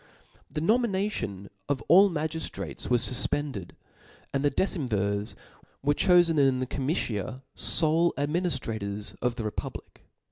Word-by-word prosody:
The 150 Hz, +2 st, -4 dB
nomination 195 Hz, -, 0 dB, 0.2 s
of 135 Hz, -5 st, -1 dB
all 195 Hz, +4 st, +7 dB
magiftrates 160 Hz, -1 st, -4 dB
was 120 Hz, -2 st, +3 dB
fufpended 130 Hz, -5 st, -1 dB, 0.3 s
\ -, -, -26 dB
and 140 Hz, 0 st, 0 dB
the 145 Hz, -, +4 dB
decemvirs 105 Hz, -, -1 dB, 0.5 s
were 145 Hz, +1 st, +3 dB
cholen 175 Hz, -1 st, +4 dB
in 135 Hz, -2 st, +3 dB
the 130 Hz, -, -1 dB
comitia 130 Hz, -, -2 dB
ibie 165 Hz, +2 st, +3 dB
adminiftrators 115 Hz, -, -2 dB
of 125 Hz, -1 st, 0 dB
the 115 Hz, -, -4 dB
republic. 105 Hz, -, -6 dB
140 Hz, 120 wpm, -27 LUFS, 115-165 Hz, 0.5 s, all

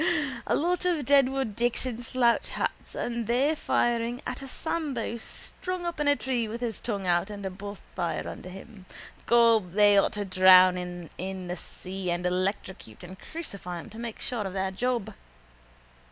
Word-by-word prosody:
A -, -, +3 dB
lot 355 Hz, +3 st, +1 dB
of 340 Hz, -6 st, +1 dB
Deadwood 270 Hz, -5 st, +3 dB
Dicks 240 Hz, +2 st, 0 dB
in 245 Hz, -2 st, -4 dB
slouch 240 Hz, 0 st, +2 dB
hats -, -, -3 dB
and 235 Hz, -2 st, -2 dB
they 260 Hz, +6 st, +3 dB
firing 240 Hz, -4 st, 0 dB
at 250 Hz, +2 st, -4 dB
a 270 Hz, -, -7 dB
Sambo 275 Hz, -6 st, -3 dB
strung 360 Hz, +9 st, -5 dB
up 340 Hz, -2 st, -3 dB
in 295 Hz, -, +1 dB
a 285 Hz, -, +5 dB
tree 250 Hz, -5 st, -1 dB
with 225 Hz, +2 st, -5 dB
his 235 Hz, -3 st, -3 dB
tongue 200 Hz, -5 st, -3 dB
out 175 Hz, +2 st, +2 dB
and 200 Hz, -1 st, -7 dB
a 190 Hz, -, -2 dB
bonfire 195 Hz, -3 st, -5 dB
under 185 Hz, -, -7 dB
him. 190 Hz, +1 st, -12 dB, 0.4 s
Gob, 230 Hz, -6 st, +4 dB
they 205 Hz, 0 st, +6 dB
ought -, -, +1 dB
to 205 Hz, -1 st, -3 dB
drown 185 Hz, -1 st, +7 dB
him 175 Hz, -2 st, -6 dB
in 185 Hz, 0 st, -4 dB
the 180 Hz, -, -2 dB
sea 185 Hz, 0 st, -6 dB
after 175 Hz, -, +2 dB
and 175 Hz, +1 st, -5 dB
electrocute 185 Hz, -, -2 dB
and 185 Hz, +2 st, -9 dB
crucify 200 Hz, -, -7 dB
him -, -, -10 dB
to 220 Hz, -, -9 dB
make 230 Hz, -2 st, -5 dB
sure 225 Hz, -5 st, -2 dB
of 185 Hz, -, -7 dB
their 190 Hz, 0 st, -1 dB
job. 240 Hz, +2 st, -1 dB
220 Hz, 180 wpm, -28 LUFS, 185-250 Hz, 0.4 s, drown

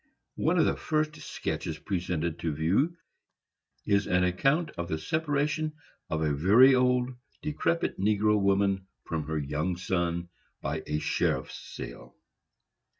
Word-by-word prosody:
One -, -, +2 dB
of -, -, +5 dB
the -, -, +2 dB
first 155 Hz, -1 st, -1 dB
sketches -, -, -4 dB
presented 85 Hz, -3 st, -2 dB
to 80 Hz, -, -1 dB
view 100 Hz, -, +1 dB, 0.9 s
is 100 Hz, -1 st, +2 dB
an 90 Hz, 0 st, +3 dB
account 135 Hz, -, +2 dB
of 85 Hz, 0 st, -5 dB
the 80 Hz, -, -1 dB
separation 155 Hz, -, 0 dB, 0.4 s
of 80 Hz, 0 st, -1 dB
a 75 Hz, -2 st, +1 dB
very 105 Hz, -, +6 dB
old, 125 Hz, 0 st, +2 dB, 0.3 s
decrepit 165 Hz, +2 st, 0 dB
negro 105 Hz, +1 st, +3 dB
woman 100 Hz, -1 st, +2 dB, 0.2 s
from 80 Hz, -3 st, -3 dB
her 80 Hz, 0 st, -1 dB
young 75 Hz, +5 st, -1 dB
son, 85 Hz, -1 st, -1 dB, 0.3 s
by -, -, -3 dB
a 75 Hz, -, 0 dB
sheriff's -, -, -1 dB, 0.2 s
sale. -, -, -8 dB
95 Hz, 135 wpm, -29 LUFS, 85-135 Hz, 0.9 s, very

